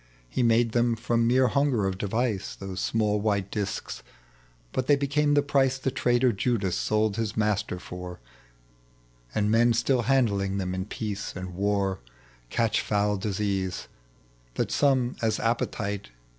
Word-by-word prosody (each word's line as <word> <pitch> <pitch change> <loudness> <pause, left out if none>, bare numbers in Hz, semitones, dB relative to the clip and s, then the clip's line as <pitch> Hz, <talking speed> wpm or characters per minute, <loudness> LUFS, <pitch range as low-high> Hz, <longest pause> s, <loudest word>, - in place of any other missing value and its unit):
lie - - +2
made 115 -1 +3
them 120 0 +2
from 115 +1 +1
rnere 130 0 +4
hunger 140 -7 +1
of 95 -1 -1
device, 110 0 -1
Those 95 -1 -6
small 105 -2 +1
white 100 -2 0
discs; 100 -3 -4 0.7
liut 130 - -1
they 145 - +6
became 145 +1 +1
the 145 - +4
price 135 -2 +2
The 135 0 -2
traitor 120 0 +2
Jud^ 100 -3 0
sold 110 -1 +1
his 110 -1 -2
Master 105 -3 0
for; 90 0 -8 1.2
And 105 0 +2
men 120 +1 +4
still 120 +2 +2
handling 105 -6 +1
them 90 -2 -2
in 95 0 -3
peace 105 -1 -5
and 90 -1 -6
war 100 0 0 0.5
Cat«h 115 - +1
foul 105 0 +1
disease, 95 -2 -2 0.7
that - - -1
comes 130 -4 +2
as 110 -1 +1
appetite. 110 - -2
110 Hz, 145 wpm, -27 LUFS, 100-120 Hz, 1.2 s, they